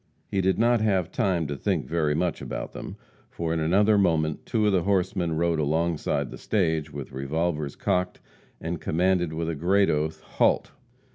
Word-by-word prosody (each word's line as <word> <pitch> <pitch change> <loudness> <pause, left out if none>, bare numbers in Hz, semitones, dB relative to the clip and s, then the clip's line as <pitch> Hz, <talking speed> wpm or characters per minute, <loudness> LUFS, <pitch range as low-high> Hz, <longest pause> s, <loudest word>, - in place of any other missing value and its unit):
He 95 - +1
did 95 -1 +2
not 120 0 +3
have 95 -5 +1
time 95 -8 +1
to 70 0 -3
think - - -1
very 80 -3 0
much 85 +1 -1
about - - -5
them, - - -7 0.3
for 80 -1 -3
in 85 - 0
another 100 +6 +3
moment 80 -5 +1
two 110 -2 +1
of 105 - +4
the 95 - +3
horsemen 90 -2 0
rode 85 -1 +1
alongside 80 +2 0
the - - -9
stage, 80 -7 0
with 70 -1 -7
revolvers 75 +2 -2
cocked, 90 0 -1 0.4
and 85 0 -4
commanded, 90 0 +1
with 80 +1 -3
a 85 - -1
great 95 +6 +2
oath, 75 +1 -1
"Halt!" - - +1
85 Hz, 180 wpm, -26 LUFS, 80-95 Hz, 0.4 s, of